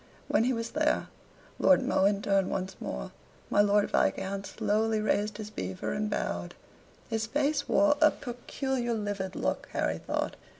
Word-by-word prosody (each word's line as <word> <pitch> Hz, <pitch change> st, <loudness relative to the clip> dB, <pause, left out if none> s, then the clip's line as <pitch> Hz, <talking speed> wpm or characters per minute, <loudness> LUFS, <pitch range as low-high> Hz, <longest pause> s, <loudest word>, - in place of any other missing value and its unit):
When 225 Hz, -, +3 dB
he 255 Hz, -, +2 dB
was 230 Hz, -2 st, -3 dB
there, 305 Hz, 0 st, +1 dB, 0.5 s
Lord 275 Hz, -1 st, +5 dB
Mohun 200 Hz, -6 st, +2 dB
turned 195 Hz, -2 st, +2 dB
once 190 Hz, 0 st, -3 dB
more, 60 Hz, -1 st, -4 dB, 0.4 s
my 205 Hz, -, +5 dB
Lord 205 Hz, 0 st, +3 dB
Viscount 195 Hz, +1 st, 0 dB
slowly 220 Hz, +1 st, +1 dB
raised 210 Hz, 0 st, 0 dB
his 215 Hz, -1 st, -7 dB
beaver 95 Hz, -, -4 dB
and 210 Hz, 0 st, -1 dB
bowed. -, -, -3 dB, 0.6 s
His 220 Hz, 0 st, 0 dB
face 285 Hz, +3 st, 0 dB
wore 300 Hz, -1 st, +5 dB
a 310 Hz, -, +8 dB
peculiar 245 Hz, -1 st, -3 dB
livid 205 Hz, -3 st, -3 dB
look, -, -, -2 dB
Harry -, -, 0 dB
thought. -, -, -2 dB
215 Hz, 155 wpm, -29 LUFS, 200-250 Hz, 0.6 s, a